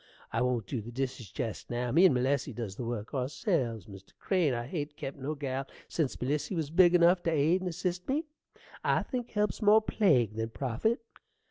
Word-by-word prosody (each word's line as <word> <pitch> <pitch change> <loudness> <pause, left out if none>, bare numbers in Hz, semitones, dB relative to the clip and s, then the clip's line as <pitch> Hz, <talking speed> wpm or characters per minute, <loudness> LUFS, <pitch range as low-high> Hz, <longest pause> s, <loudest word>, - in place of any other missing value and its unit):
I 115 - +1
won't 125 -4 0
dew 120 +3 -3
the 115 +3 -9
dishes 125 -3 -4
jest 110 - -5
now. 120 0 -2
Me 170 +8 +6
and 140 - +2
Melissy 130 +1 0
does 110 -4 -5
the 125 - -5
work 115 -2 -4
ourselves, 130 - -1
Mr. 95 -1 -13
Crane. 180 -7 +2
I 120 -1 -2
hain't 145 +1 -4
kept 135 - -5
no 145 +4 -3
gal 135 -1 -3 0.2
sense 155 -6 -1
Melissy 145 +8 -1
was 155 -3 -2
big 175 +1 +6
enough 175 +1 +5
t' 170 - 0
aid 160 +4 +3
and 185 - -2
assist 180 +3 -3
me. 300 +5 0 0.6
I - - +2
think 245 -3 -4
help's 210 +1 -1
more 210 +1 +7
plague 150 - +2
than 110 +1 -3
profit. 135 - -1
140 Hz, 200 wpm, -30 LUFS, 120-175 Hz, 0.6 s, more